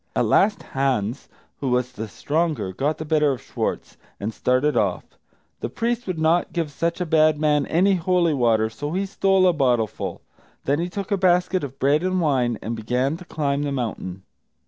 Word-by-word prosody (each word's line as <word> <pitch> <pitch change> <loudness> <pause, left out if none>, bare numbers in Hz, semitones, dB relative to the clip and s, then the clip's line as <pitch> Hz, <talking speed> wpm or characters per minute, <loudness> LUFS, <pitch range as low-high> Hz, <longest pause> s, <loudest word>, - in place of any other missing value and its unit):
At - - +2
last, 205 +1 +3
Hans, 130 -3 -1 0.3
who 135 - -2
was 125 0 0
the 110 -3 -6
stronger, 150 - -1
got 145 +9 -1
the 155 - -6
better 150 -2 +2
of 130 - -6
Schwartz, - - -4 0.2
and 105 +2 -3
started 130 +6 +1
off. - - +1 0.6
The - - -3
priest 240 0 -2
would 185 -3 -2
not 160 +2 +2
give 165 -4 -2
such 170 +4 -2
a - - 0
bad 155 -2 +3
man 150 -2 +2
any 190 +4 +3
holy 175 -2 +2
water, 115 -5 +2
so 145 +7 -5
he 195 +2 0
stole 195 -1 +3
a 180 - +4
bottleful. 125 - 0 0.4
Then 140 +2 +1
he 175 +1 -2
took 200 +2 -5
a 200 - +3
basket 180 -1 +2
of 135 -1 -6
bread 145 +3 +2
and 185 0 0
wine, 130 -8 +1
and 115 +2 -3
began 125 +6 -1
to 180 - -12
climb 145 -4 -1
the 145 -1 -2
mountain. 105 -8 -4
150 Hz, 190 wpm, -23 LUFS, 125-175 Hz, 0.6 s, a